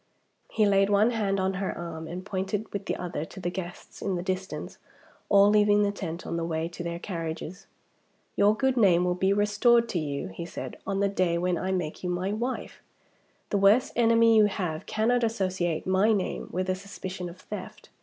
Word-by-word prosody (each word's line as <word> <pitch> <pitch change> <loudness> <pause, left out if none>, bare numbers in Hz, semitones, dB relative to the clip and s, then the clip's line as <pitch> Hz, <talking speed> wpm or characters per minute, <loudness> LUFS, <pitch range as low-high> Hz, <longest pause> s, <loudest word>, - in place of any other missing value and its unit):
He 215 - +2
laid 195 -1 +3
one 205 +3 +4
hand 200 -4 0
on 190 0 0
her 195 - -2
arm, 165 -2 -6
and 180 +3 -6
pointed 195 +2 -3
with 200 -1 -4
the - - 0
other 175 -4 -4
to 190 - -11
the 175 -1 -2
guests 180 -1 -8
in 195 -2 -1
the 175 - -3
distance, 185 +1 -4 0.5
all 200 0 +6
leaving 210 0 +4
the 200 - +1
tent 175 -4 -6
on 170 - -3
the 165 - -2
way 165 -1 -2
to 175 0 -7
their 170 0 -3
carriages. 170 -1 -6 0.7
"Your 210 +2 +4
good 265 0 +1
name 180 -6 +5
will 180 - +2
be 190 +2 +1
restored 210 +4 +3
to 175 - -1
you," 140 -8 -3
he 95 - -7
said, - - -6
"on 195 0 0
the 200 - +3
day 185 -3 +1
when 180 +1 +1
I 185 +3 -2
make 180 -4 -3
you 180 - -1
my 180 +3 -1
wife. 240 +4 -4 0.7
The 200 - +2
worst 205 +6 +4
enemy 230 -1 +5
you 215 -1 +7
have 180 -5 -3
cannot 240 +3 +1
associate 185 -7 -1
my 190 +4 +3
name 195 -3 -2
with 185 +1 -2
a 185 - +2
suspicion 185 -1 -6
of 170 - -12
theft. - - -8
190 Hz, 205 wpm, -27 LUFS, 175-205 Hz, 0.7 s, you